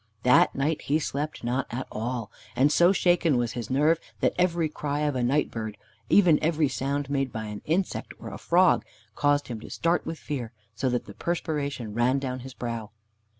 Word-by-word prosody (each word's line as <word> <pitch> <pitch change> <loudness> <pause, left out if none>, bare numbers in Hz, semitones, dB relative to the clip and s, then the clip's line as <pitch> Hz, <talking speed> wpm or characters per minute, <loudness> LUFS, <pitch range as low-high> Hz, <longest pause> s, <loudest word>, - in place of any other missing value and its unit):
That 125 0 +5
night 145 +3 0
he 145 - +1
slept 150 -1 -3
not 125 +3 -1
at 130 +2 -4
all, 115 0 -3 0.2
and 140 +3 +4
so 175 +4 +5
shaken 175 -6 +3
was 120 -1 0
his 120 -3 -5
nerve 150 +5 +3 0.2
that - - +2
every 170 -2 +2
cry 150 -1 -3
of 145 -2 0
a 125 - 0
night 135 +5 +1
bird, 110 -2 -5 0.3
even 180 -6 +6
every 155 -1 +2
sound 140 +1 -2
made 135 -2 -1
by 110 -1 -4
an 105 -1 -6
insect 180 +5 -1
or - - -8
a - - -8
frog, - - +4 0.3
caused 145 0 +2
him 120 -3 -5
to - - -10
start 170 +1 +1
with 165 - -4
fear, 125 -7 -5 0.2
so 130 - -1
that 125 -1 -1
the - - -10
perspiration 145 -9 -3
ran 120 +4 +2
down 130 -2 -3
his 130 +1 -10
brow. 115 -3 -4
140 Hz, 195 wpm, -27 LUFS, 120-155 Hz, 0.3 s, even